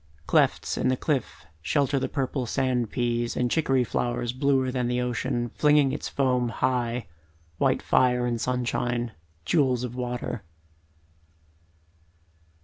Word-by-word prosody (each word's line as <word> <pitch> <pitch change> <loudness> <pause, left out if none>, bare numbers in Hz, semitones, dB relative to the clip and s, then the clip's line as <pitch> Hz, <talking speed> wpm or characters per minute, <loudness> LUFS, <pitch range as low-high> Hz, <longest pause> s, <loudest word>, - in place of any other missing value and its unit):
Clefts - - +2
in - - +1
the 130 0 +2
cliff 135 - -2 0.2
shelter 140 - +1
the - - -2
purple 135 -2 -2
sand 125 -3 0
peas 120 0 -1
And 125 -1 0
chicory 135 -5 +2
flowers 120 0 -2
bluer 130 -1 +1
than 125 -1 -1
the 125 0 0
ocean 125 0 -1
Flinging 150 -2 +4
its - - -4
foam 125 -3 +1
high, 120 -1 -1 0.5
white - - +2
fire 125 -1 +3
in 120 -1 -1
sunshine, 120 -1 -1 0.3
Jewels 130 - +2
of 125 -1 -4
water. 125 -2 -4
125 Hz, 130 wpm, -26 LUFS, 120-130 Hz, 0.5 s, Flinging